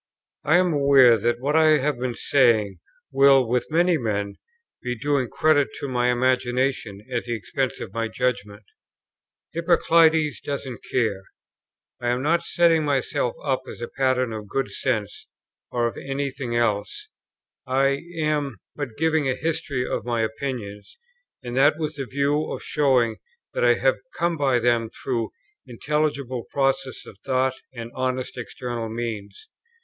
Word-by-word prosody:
I 160 - +4
am 180 -2 +2
aware 140 -4 +6
that 120 +2 0
what 145 +4 -1
I 155 -1 +6
have 140 -2 -1
been 125 -1 -2
saying 110 -9 +3 0.3
will, 135 -2 +5
with 125 +2 0
many 170 +1 +3
men, 100 -4 -2 0.4
be 125 0 -3
doing 140 -1 0
credit 155 -3 +3
to 140 - -4
my 125 -1 +1
imagination 125 -4 0
at 120 - -1
the 120 -1 -2
expense 130 +5 -3
of 100 - -7
my 115 0 -1
judgment 110 -4 -2 0.9
"Hippoclides 165 -3 +3
doesn't 135 -4 -5
care;" 105 -6 0 0.8
I 120 - 0
am 125 +2 0
not 165 +3 +2
setting 170 -2 +3
myself 135 -4 0
up 135 -3 0
as - - -9
a 120 - -4
pattern 130 -2 0
of 105 -1 -6
good 135 +6 -2
sense 110 -6 -2 0.4
or 120 -1 0
of 115 - -2
any 140 0 -3
thing 130 -3 -4
else: 110 -4 -1 0.6
I 135 +1 +2 0.2
am 150 -3 -1 0.2
but 135 -7 -5
giving 160 -3 +1
a 130 - 0
history 150 -5 -2
of - - -2
my 120 -1 -1
opinions, 110 - -5 0.5
and 120 -1 -5
that, 145 +3 +5
with 155 -2 -4
the 135 -2 -4
view 140 +3 0
of - - -5
showing 130 -6 +2 0.4
that - - -1
I - - +5
have - - +2 0.2
come 170 0 0
by 135 -4 +2
them 120 -1 +1
through 115 -3 -3 0.4
intelligible 140 -1 -2
processes 135 -2 -1
of 95 - -13
thought 130 -1 0 0.2
and 115 -2 -8
honest 130 0 -2
external 120 -1 -5
means. 110 -3 -6
130 Hz, 155 wpm, -24 LUFS, 120-145 Hz, 0.9 s, aware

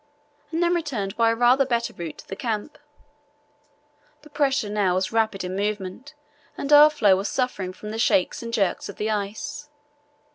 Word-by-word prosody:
and 335 +1 0
then 345 0 +2
returned 245 - -2
by 230 0 +3
a 230 - +1
rather 245 +3 +4
better 235 -3 -1
route 170 -3 -7
to - - -13
the 195 - -6
camp. 220 +5 -4 1.4
The 300 - -16
pressure 280 -6 +1
now 205 -3 +1
was 185 0 -1
rapid 220 -4 0
in 180 +1 -4
movement 205 +7 -4 0.4
and 280 +1 0
our 295 +1 +9
floe 210 -10 +3
was 195 +2 -2
suffering 225 -8 -2
from 210 +3 -9
the 220 - -5
shakes 190 -5 +2
and 230 0 -6
jerks 200 -5 0
of 200 - -8
the 215 +1 -2
ice. 220 +9 -4
225 Hz, 180 wpm, -24 LUFS, 200-275 Hz, 1.4 s, our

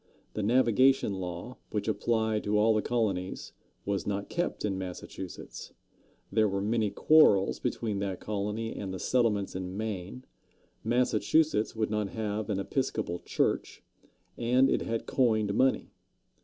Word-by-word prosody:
The 110 - -2
Navigation 125 +1 +3
Law, 90 +7 -6
which 105 0 -3
applied 110 0 0
to 105 +1 +2
all 110 +2 +4
the 110 - +2
colonies, 100 -7 -2 0.3
was 100 -1 -2
not 100 0 -2
kept 175 -9 -2
in 100 -2 -1
Massachusetts; 90 0 -8 0.6
there 110 +1 +3
were 100 0 -1
many 110 +1 +1
quarrels 100 -4 +4
between 105 -4 -2
that 95 -2 -3
colony 105 +2 -3
and 95 -2 -5
the 95 - -4
settlements 110 -7 +1
in 95 +1 -5
Maine; 110 +3 -5 0.6
Massachusetts 120 +2 +2
would 110 -1 -1
not 105 -2 -1
have 105 0 -3
an 105 - 0
Episcopal 100 -4 -2
church; - - -1 0.6
and 125 +3 +3
it - - +1
had 115 0 -3
coined 110 -5 +2
money. 130 +5 +2
105 Hz, 140 wpm, -29 LUFS, 100-115 Hz, 0.6 s, all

